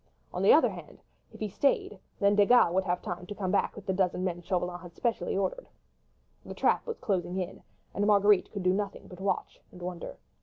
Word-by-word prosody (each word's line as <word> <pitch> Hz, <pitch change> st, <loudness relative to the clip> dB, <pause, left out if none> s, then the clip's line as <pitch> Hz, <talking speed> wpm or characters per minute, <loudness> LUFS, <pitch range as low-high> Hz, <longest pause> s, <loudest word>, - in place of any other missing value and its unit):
On -, -, -3 dB
the -, -, +6 dB
other -, -, +6 dB
hand, -, -, -11 dB, 0.3 s
if -, -, -14 dB
he 215 Hz, -, -2 dB
stayed, 210 Hz, -2 st, 0 dB, 0.2 s
then 200 Hz, +1 st, +4 dB
Desgas 205 Hz, -3 st, +5 dB
would 190 Hz, +1 st, +1 dB
have 180 Hz, -1 st, -1 dB
time 180 Hz, 0 st, -5 dB
to 205 Hz, -, -6 dB
come 190 Hz, -3 st, -2 dB
back 200 Hz, -, +1 dB
with 205 Hz, -, -10 dB
the 195 Hz, -, 0 dB
half -, -, -5 dB
dozen 185 Hz, -1 st, +1 dB
men 175 Hz, -2 st, -2 dB
Chauvelin 180 Hz, 0 st, -2 dB
had 175 Hz, -1 st, -12 dB
specially 235 Hz, -4 st, -1 dB
ordered. -, -, -2 dB, 0.7 s
The -, -, -8 dB
trap -, -, +1 dB
was 465 Hz, -, -4 dB
closing 180 Hz, -2 st, -2 dB
in, 185 Hz, 0 st, -4 dB, 0.3 s
and 205 Hz, +1 st, 0 dB
Marguerite 205 Hz, -2 st, +4 dB
could 200 Hz, -3 st, -5 dB
do 185 Hz, 0 st, +3 dB
nothing 200 Hz, 0 st, -3 dB
but 180 Hz, -, -12 dB
watch 195 Hz, -, -2 dB
and 180 Hz, -, -13 dB
wonder. 175 Hz, -1 st, -6 dB
190 Hz, 220 wpm, -29 LUFS, 180-205 Hz, 0.7 s, the